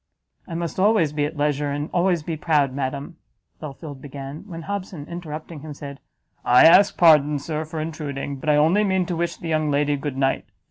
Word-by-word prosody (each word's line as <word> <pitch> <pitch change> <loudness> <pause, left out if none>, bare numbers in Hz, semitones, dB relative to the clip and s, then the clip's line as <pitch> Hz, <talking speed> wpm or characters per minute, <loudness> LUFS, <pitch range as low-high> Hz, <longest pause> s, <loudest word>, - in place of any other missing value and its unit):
"I 165 - -6
must 170 +1 -4
always 190 -7 +3
be 145 -1 0
at 155 +1 -6
leisure, 145 0 0
and 145 +1 -3
always 175 -2 +2
be 165 +1 -3
proud, 150 -4 +1
madam," 140 +4 -4 0.4
Belfield 145 -1 -8
began, 140 +5 -8
when 165 -4 -8
Hobson, 190 -5 -5
interrupting 160 -2 -7
him, 150 0 -8
said, 140 -1 -9 0.4
"I 125 +1 +6
ask 190 +5 +6
pardon, 150 -3 +5
Sir, 155 +2 -4
for 160 +1 -6
intruding, 145 -3 -4
but 150 +3 -4
I 150 - +5
only 165 +8 +4
mean 190 -2 +1
to 175 - -3
wish 170 +1 -2
the 170 - -7
young 155 -1 +1
lady 145 0 +1
good 140 -1 -5
night. 135 0 0
155 Hz, 195 wpm, -23 LUFS, 145-170 Hz, 0.4 s, I